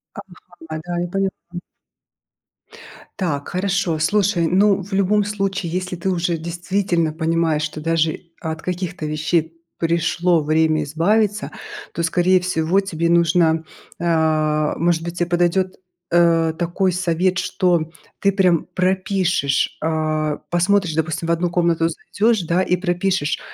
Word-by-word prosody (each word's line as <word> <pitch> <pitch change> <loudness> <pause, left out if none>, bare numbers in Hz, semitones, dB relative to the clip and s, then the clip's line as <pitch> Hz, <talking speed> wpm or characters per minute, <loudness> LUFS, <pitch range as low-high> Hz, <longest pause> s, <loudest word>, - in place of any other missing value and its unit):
Ага. 200 -2 -10 0.4
А, 155 - -3
да, 175 0 -3
я 175 - -1
поняла. 190 -2 -3 1.6
Так, 150 -7 -2
хорошо. 185 -3 0
Слушай, 190 0 +2
ну, 195 +2 +3
в 195 +3 -11
любом 200 +2 +2
случае, 195 -3 -2
если 185 +1 -3
ты 180 +3 -3
уже 175 -2 0
действительно 170 0 -1
понимаешь, 160 -1 0
что 155 0 -4
даже 165 0 0 0.2
от 160 0 -4
каких-то 180 -1 -4
вещей 155 +2 0 0.2
пришло 170 +1 +1
время 155 0 +2
избавиться, 205 +8 0 0.4
то, 170 - -2
скорее 180 +2 +3
всего, 180 +1 +1
тебе 170 -4 -2
нужно 165 -1 +3 0.4
а, 155 -2 +1
может 170 0 +1
быть, 170 0 -6
тебе 175 0 0
подойдёт, 175 +2 +1 0.4
э, 165 -1 +3
такой 180 +2 0
совет, 180 +1 0
что 175 -4 0 0.3
ты 200 - +3
прям 185 -4 +2
пропишешь, 185 -6 +1
а 155 -1 -1
посмотришь, 175 0 +2
допустим, 160 +1 -2
в - - +1
1 170 +1 +1
комнату 170 -1 +1
зайдёшь, 215 +6 0
да, 170 +2 +1
и 180 -1 +1
пропишешь, 180 -3 0
175 Hz, 135 wpm, -20 LUFS, 160-185 Hz, 1.6 s, ну